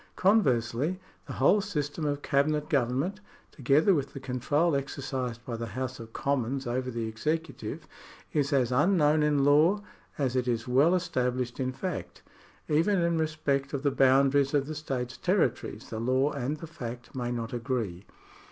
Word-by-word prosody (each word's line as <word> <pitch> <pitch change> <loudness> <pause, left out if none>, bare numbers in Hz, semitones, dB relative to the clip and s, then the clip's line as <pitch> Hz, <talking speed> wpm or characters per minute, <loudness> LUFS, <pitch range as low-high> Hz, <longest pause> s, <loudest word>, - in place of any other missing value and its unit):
Conversely, 150 - +2 0.3
the - - -5
whole 205 - +4
system 150 -6 -3
of 145 -1 -2
cabinet 150 +2 +1
government, 140 - 0 0.3
together 145 +8 +3
with 140 -5 -1
the - - -6
control 140 +5 0
exercised 130 -3 -4
by 120 - -4
the 115 0 -4
House 130 0 -3
of 115 -1 -9
Commons 135 +1 -1
over 125 +1 -2
the 115 -2 -3
executive, 155 +9 -3 0.5
is 145 -1 +1
as 130 -4 +2
unknown 150 +2 +3
in 150 -2 +2
law 155 +9 +4 0.3
as 130 -3 0
it 125 -1 0
is 115 -1 -1
well 140 +8 +4
established 125 -8 -1
in 130 -1 0
fact. 135 - -5 0.4
Even 165 +6 +2
in 170 -1 +1
respect 150 -3 -1
of 140 -1 -2
the 140 - +2
boundaries 135 +2 +4
of 140 -1 +2
the 155 - -5
state's 130 -5 -4
territories 130 - -1
the 110 - -3
law 130 +5 +2
and 140 +2 -3
the 165 - -8
fact 120 -7 -8
may 120 -2 -3
not 115 -1 -4
agree. 115 -7 -3
140 Hz, 160 wpm, -28 LUFS, 125-155 Hz, 0.5 s, whole